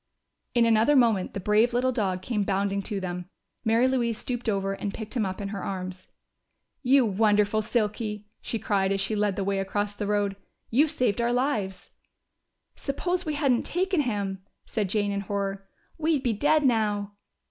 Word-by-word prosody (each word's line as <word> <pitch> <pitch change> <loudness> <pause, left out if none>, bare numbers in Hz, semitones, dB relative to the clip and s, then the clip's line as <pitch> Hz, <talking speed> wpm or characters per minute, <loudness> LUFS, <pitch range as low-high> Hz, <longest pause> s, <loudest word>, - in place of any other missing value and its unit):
In 235 -1 +5
another 230 +5 +4
moment 230 -7 +3
the - - -1
brave 215 +5 +3
little 255 +1 +2
dog 190 -6 -1
came 215 0 -1
bounding 200 0 0
to 200 0 -3
them. 180 -1 -5 0.3
Mary 230 +2 +3
Louise 240 -4 0
stooped 245 -2 -3
over 195 -1 0
and 200 +1 -3
picked 220 -1 -7
him 220 -5 +1
up 185 - -5
in 200 -1 -4
her 200 -2 -4
arms. 185 -1 -5 0.7
"You 265 -1 +5
wonderful 210 0 +3
Silky!" 210 -1 -1 0.2
she 230 - -2
cried, 195 -2 +1
as 195 - +1
she 195 +3 0
led 205 -2 +1
the 195 - -1
way 195 0 0
across 205 +1 -1
the 205 -1 -3
road. 205 -1 0 0.3
"You 280 +7 +4
saved 250 -7 0
our 235 0 +1
lives!" 235 -7 -1 0.8
"Suppose 355 +5 -2
we 305 - -1
hadn't 275 -5 +2
taken 370 -1 0
him!" 200 -6 -2 0.2
said 210 -4 -2
Jane 205 0 +1
in 200 0 -1
horror. 195 -1 -3 0.3
"We'd 310 -3 +1
be 240 -4 +1
dead 295 +7 +3
now." 210 -4 +1
210 Hz, 180 wpm, -27 LUFS, 195-245 Hz, 0.8 s, In